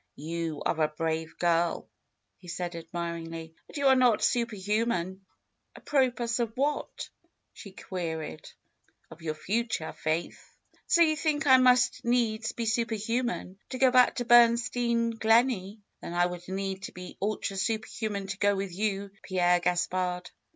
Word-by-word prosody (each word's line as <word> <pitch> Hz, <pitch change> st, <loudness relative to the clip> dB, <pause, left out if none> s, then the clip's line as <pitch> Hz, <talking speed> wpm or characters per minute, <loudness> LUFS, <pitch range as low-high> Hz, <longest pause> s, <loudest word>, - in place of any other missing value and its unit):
^^You 160 Hz, 0 st, -4 dB
are 160 Hz, -, 0 dB
a 155 Hz, -, +4 dB
brave 160 Hz, +1 st, -3 dB
girl," 170 Hz, -1 st, +1 dB, 0.5 s
he 180 Hz, -, -15 dB
said 175 Hz, 0 st, -4 dB
admiringly; 165 Hz, -1 st, -6 dB, 0.2 s
'^but -, -, -7 dB
you 280 Hz, -, -1 dB
are 265 Hz, -1 st, +7 dB
not 250 Hz, -4 st, +3 dB
super 235 Hz, -2 st, +1 dB
human." 195 Hz, -2 st, -1 dB, 0.5 s
Apropos 250 Hz, -4 st, 0 dB
of 230 Hz, -2 st, -1 dB
what?" 290 Hz, +2 st, -2 dB, 0.4 s
she 200 Hz, -, -11 dB
queried. 160 Hz, -, -5 dB, 0.6 s
^^Of 160 Hz, +1 st, -12 dB
your 155 Hz, -1 st, -3 dB
future. 220 Hz, 0 st, -2 dB
Faith." 160 Hz, +2 st, -2 dB, 0.5 s
^^So 340 Hz, -1 st, +6 dB
you 310 Hz, -, +1 dB
think 310 Hz, 0 st, 0 dB
I 260 Hz, -2 st, +8 dB
must 250 Hz, -1 st, +4 dB
needs 230 Hz, -2 st, +1 dB
be 235 Hz, -, -4 dB
super 225 Hz, 0 st, 0 dB
human 225 Hz, -3 st, -2 dB
to 260 Hz, -, -4 dB
go 260 Hz, 0 st, +4 dB
back 250 Hz, -1 st, +5 dB
to 245 Hz, -, -2 dB
Bernstein 235 Hz, 0 st, +4 dB
Gleney! 225 Hz, -3 st, +2 dB, 0.2 s
Then 170 Hz, -, -6 dB
I 175 Hz, 0 st, +4 dB
would 180 Hz, 0 st, -6 dB
need 190 Hz, 0 st, -3 dB
to -, -, -9 dB
be 180 Hz, 0 st, -10 dB
ultra 200 Hz, -1 st, -2 dB
super 220 Hz, +3 st, -1 dB
human 205 Hz, -3 st, -4 dB
to 195 Hz, 0 st, -6 dB
go 205 Hz, 0 st, +3 dB
with 195 Hz, -2 st, -4 dB
you, 200 Hz, 0 st, -2 dB
Pierre 180 Hz, -2 st, +2 dB
Gaspard 180 Hz, +1 st, -1 dB
200 Hz, 155 wpm, -28 LUFS, 175-235 Hz, 0.6 s, I